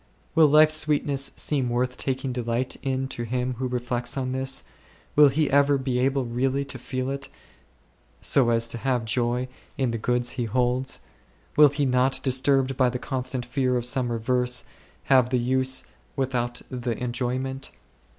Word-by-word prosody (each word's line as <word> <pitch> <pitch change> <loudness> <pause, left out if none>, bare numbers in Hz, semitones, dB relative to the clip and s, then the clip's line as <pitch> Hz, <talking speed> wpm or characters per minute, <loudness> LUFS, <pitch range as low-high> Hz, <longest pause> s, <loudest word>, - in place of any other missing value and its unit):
Will 160 -1 +6
life's 155 +1 +6
sweetness 145 -3 +1
seem 135 -5 0
worth 125 +1 -1
taking 130 -1 -2
delight 120 +1 -1
in 135 -1 -1
to 120 - -5
him 125 +2 -2
who 130 - -1
reflects 125 0 -2
on 130 -1 -2
this? 130 +1 -1 0.5
Will 150 -1 +7
he 150 +2 +1
ever 140 0 +4
be 130 -2 -1
able 135 0 +1
really 130 +4 -1
to 135 -2 -7
feel 130 +2 -3
it, 140 0 -5 0.9
so 130 -4 +3
as 115 0 +2
to 120 - -5
have 125 -2 0
joy 120 +2 0 0.3
in 130 -3 0
the 115 - -3
goods 120 +2 0
he 125 -3 -3
holds? 125 +3 0 0.5
Will 150 0 +8
he 145 +1 -1
not, 130 +1 +2
disturbed 135 0 +2
by 130 -1 +3
the 125 - -3
constant 130 -1 -3
fear 125 0 0
of 120 - -2
some 125 -1 0
reverse, 125 +1 0 0.4
have 130 -2 +4
the 130 - +1
use 130 +2 0 0.3
without 125 -3 -2
the 120 -2 -3
enjoyment 130 +2 -3
130 Hz, 165 wpm, -25 LUFS, 125-135 Hz, 0.9 s, Will